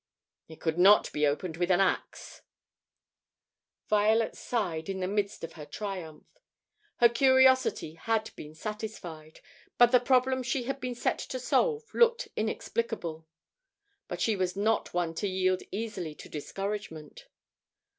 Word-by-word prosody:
"It 160 - -13
could 160 +1 -1
not 200 +3 +6
be 150 0 +2
opened 160 +3 -2
with 175 +1 0
an 180 0 +4
axe." 195 - -1 1.5
Violet 215 +2 +2
sighed 180 -8 -3
in 190 -1 -3
the 185 - -1
midst 205 0 -2
of 165 - -6
her 155 - -9
triumph. 180 -2 -6 0.7
Her 240 - +6
curiosity 260 - +4
had 220 +6 -1
been 150 +1 -10
satisfied, 180 -6 -7 0.4
but 240 0 +6
the 250 - +6
problem 260 +1 +2
she 250 +1 -1
had 270 +2 -4
been 250 -1 -4
set - - -1
to 260 - -5
solve 445 - +1
looked 470 0 +3
inexplicable. 215 -7 -3 0.8
But - - -5
she 220 - +2
was 185 -1 -1
not 215 +3 0
one 175 -2 -1
to 200 +5 -2
yield 185 -1 +1
easily 190 -7 -4
to - - -11
discouragement. 195 - -6
205 Hz, 140 wpm, -29 LUFS, 170-240 Hz, 1.5 s, not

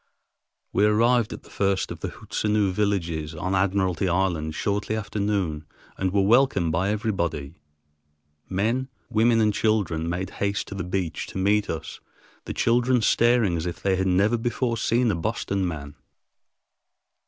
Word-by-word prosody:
We 100 - +3
arrived 115 +2 +3
at - - -8
the - - -17
first 95 -1 0
of - - -7
the - - -3
Hootsenoo 105 -2 -1
villages 85 -6 -1
on 95 +5 -2
Admiralty 95 -1 +1
Island 85 -4 0
shortly 105 +2 -1
after 110 -1 -4
noon 95 -7 -1 0.3
and 95 -1 -1
were 100 0 +2
welcomed 105 -6 +3
by 90 +5 0
everybody. 95 -9 -2 1.0
Men, 115 +8 0 0.2
women, 115 +1 +3
and 105 -1 +3
children 95 -8 0
made 90 +2 -3
haste 100 0 0
to - - -6
the 95 -2 -4
beach 90 -3 -3
to - - -7
meet 100 +2 +2
us, 80 -1 -5 0.5
the - - -4
children 120 0 +2
staring 115 -5 +3
as 85 +1 -2
if 85 - -6
they 95 -1 +2
had 95 +1 0
never 100 +6 +2
before 120 +1 -1
seen 115 +1 +2
a - - -1
Boston 100 0 -1
man. 75 -4 -6
100 Hz, 155 wpm, -25 LUFS, 90-110 Hz, 1.0 s, We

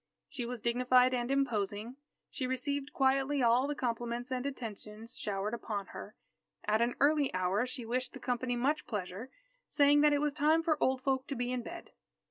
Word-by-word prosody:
She 240 -2 -4
was 245 0 -5
dignified 250 +2 +3
and 240 0 -1
imposing. 230 -4 -1 0.4
She 255 - -3
received 280 +2 -2
quietly 270 +1 +2
all 240 +3 +4
the 295 - -2
compliments 240 0 -3
and 250 -1 -1
attentions 225 -3 -7
showered 205 +1 -3
upon 210 -4 -3
her. - - -8 0.5
At 215 +2 +2
an 240 +1 +1
early 290 -1 +3
hour 185 +6 +1
she 250 -1 -5
wished 255 +3 -2
the - - -8
company 245 0 -1
much 275 +6 0
pleasure, 205 +3 -4 0.4
saying 290 0 +4
that 300 0 +5
it 290 - +3
was 295 0 0
time 310 +2 +3
for 315 -3 +1
old 260 0 +1
folk 265 -1 0
to 280 - -3
be 245 0 -2
in 250 -1 -1
bed. - - -9
250 Hz, 185 wpm, -32 LUFS, 230-275 Hz, 0.5 s, that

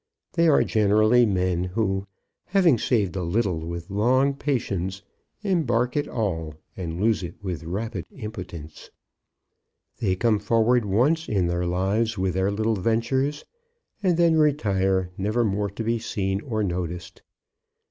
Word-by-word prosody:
They 170 -1 +3
are 150 - +5
generally 110 +3 +4
men 90 -3 0
who, 95 0 -1 0.4
having 180 - +3
saved 105 -8 +1
a 95 - -2
little 90 0 0
with 85 +2 -6
long 130 +7 +3
patience, 100 -9 -2 0.4
embark 125 - +1
it 145 - 0
all 80 -9 -2 0.2
and 85 -2 -5
lose 110 +1 +2
it 85 -1 -6
with 90 -4 -4
rapid 95 +2 -4
impotence. 90 - -8 1.1
They 95 -4 +1
come 110 +1 +2
forward 115 +2 +2
once 135 +12 +1
in 95 -4 +1
their 85 +1 -1
lives 100 +5 0
with 95 -1 0
their 95 +1 +1
little 110 +2 0
ventures, 130 +8 0 0.6
and 180 -4 +2
then 165 -2 +4
retire 95 -11 +1
never 110 +5 +1
more 100 0 0
to 100 +4 -5
be 115 +1 0
seen 95 -3 -2
or 110 -5 -2
noticed. 90 -2 -4
105 Hz, 140 wpm, -25 LUFS, 95-120 Hz, 1.1 s, are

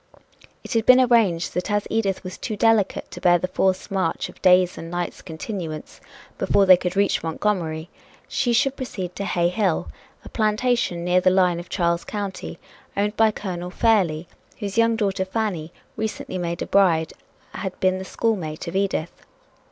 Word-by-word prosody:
It - - -6
had 225 -1 +1
been 255 0 +8
arranged 225 -9 +3
that 180 +4 -2
as 205 0 0
Edith 200 -4 0
was 185 0 -6
too 220 - -3
delicate 225 -2 +2
to - - -9
bear 175 -1 +5
the 185 - -2
forced 190 +2 0
march 190 -4 -1
of - - -16
days' 180 -1 +5
and 165 - -8
nights' 175 0 -4
continuance 160 -2 -6 0.4
before 200 - +3
they 185 -1 +9
could 180 +1 -3
reach 200 0 +2
Montgomery, 165 -2 -2 0.4
she 255 -3 0
should 265 +4 +2
proceed 190 -9 -5
to 200 - -4
Hay 175 -2 +1
Hill, 190 -3 0 0.4
a - - -9
plantation 215 -5 0
near 180 +1 +3
the 185 - +4
line 180 -2 +3
of 175 - -10
Charles 170 -2 0
County, 200 -3 -5 0.4
owned 205 +1 0
by 225 0 +4
Colonel 180 -4 -5
Fairlie, 180 -6 +1 0.3
whose 200 -3 -5
young 230 0 +3
daughter 195 -3 0
Fanny, 190 -5 -3 0.2
recently 220 -3 -4
made 170 0 -3
a - - -5
bride, 170 -5 +3 0.4
had 190 -2 -5
been 185 0 +2
the - - -5
schoolmate 185 -8 -2
of 170 - -5
Edith. 195 -4 0
190 Hz, 175 wpm, -23 LUFS, 175-215 Hz, 0.4 s, they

